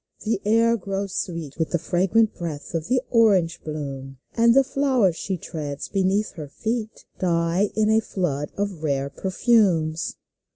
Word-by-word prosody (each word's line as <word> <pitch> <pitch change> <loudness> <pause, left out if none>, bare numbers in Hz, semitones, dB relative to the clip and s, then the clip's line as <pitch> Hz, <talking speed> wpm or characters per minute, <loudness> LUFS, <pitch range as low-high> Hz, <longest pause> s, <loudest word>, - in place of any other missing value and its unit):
The 215 -2 -1
air 230 +2 +4
grows 195 -1 -4
sweet 165 -5 -4
With 160 - 0
the 175 - +1
fragrant 185 +6 +2
breath 160 -4 -6
of 165 -1 -2
the 250 +1 +1
orange 195 -8 +3
blooms, 135 -3 -6 0.2
And 235 +1 +4
the 275 - +7
flowers 260 -10 +2
she 190 +2 -3
treads 150 -4 -6
beneath 195 +2 +1
her 155 -3 -8
feet 220 - -4
Die 170 +2 +1
in 215 0 +3
a 220 - +5
flood 150 -9 -2
of 200 -5 -3
rare 140 -2 -1
perfumes 185 -6 +1
185 Hz, 155 wpm, -24 LUFS, 160-220 Hz, 0.2 s, the